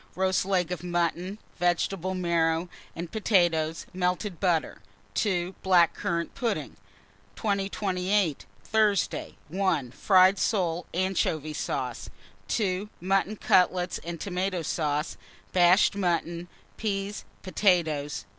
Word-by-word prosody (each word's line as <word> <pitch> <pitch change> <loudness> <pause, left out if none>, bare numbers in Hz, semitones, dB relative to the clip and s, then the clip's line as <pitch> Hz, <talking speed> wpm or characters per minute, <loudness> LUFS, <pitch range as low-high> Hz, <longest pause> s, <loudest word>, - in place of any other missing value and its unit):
Roast 185 0 +1
leg 180 -3 +1
of 180 - -3
mutton, 175 +2 -1 0.2
vegetable 175 +1 0
marrow, 170 -1 +1 0.3
and 170 0 -6
potatoes, 170 -7 +1
melted 180 0 -1
butter. 175 -5 0 0.3
2. 185 -3 0
Black 175 -3 +4
currant 170 0 -2
pudding. 215 - -2 0.6
2028. 195 -4 0 0.2
Thursday. 215 -3 +1
1. 170 -8 0
Fried 190 +5 +5
soles, 175 -5 0
anchovy 165 -5 0
sauce. - - -3 0.4
2. 200 -1 -1
Mutton 195 +3 +1
cutlets 180 -2 +2
and 170 -1 -6
tomato 185 -1 -2
sauce, 150 -1 -1 0.4
bashed 180 +3 +5
mutton, 175 -2 -1 0.3
peas, 200 -1 -3 0.2
potatoes. 165 -7 +1
180 Hz, 100 wpm, -27 LUFS, 170-195 Hz, 0.6 s, Fried